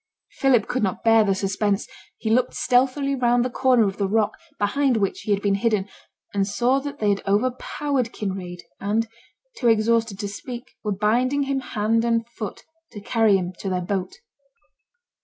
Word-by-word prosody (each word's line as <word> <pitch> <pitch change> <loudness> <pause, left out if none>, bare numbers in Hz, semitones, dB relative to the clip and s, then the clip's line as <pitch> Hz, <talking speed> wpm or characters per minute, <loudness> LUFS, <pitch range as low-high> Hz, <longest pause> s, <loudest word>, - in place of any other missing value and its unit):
Philip 255 -6 +2
could 255 - -1
not 190 -3 -1
bear 225 -1 +6
the 195 -2 +1
suspense; 200 +1 0 0.3
he 220 - -2
looked 250 +2 +2
stealthily 255 +3 +2
round 245 -2 +2
the 255 - -2
corner 250 -3 +3
of 195 - -4
the 200 - 0
rock 215 +1 +2 0.3
behind 255 +4 +1
which 200 -3 -1
he 210 - -3
had 200 0 +1
been 200 -1 +2
hidden, 205 -1 +1 0.5
and 200 -1 +1
saw 245 +6 +2
that 285 +1 -6
they 210 - +1
had 200 -1 +1
overpowered 255 +4 0
Kinraid, 185 -3 -5 0.2
and, 215 +3 0 0.5
too 245 - 0
exhausted 225 -1 +2
to 205 0 -3
speak, 240 +4 -8
were 210 - -1
binding 240 +8 +1
him 275 0 -1
hand 225 -2 0
and 230 -1 +1
foot 215 -4 -7 0.3
to 205 - -7
carry 215 0 +3
him 180 -1 -4
to 195 - -3
their 185 -1 0
boat. 185 +1 -3
225 Hz, 175 wpm, -23 LUFS, 200-245 Hz, 0.5 s, bear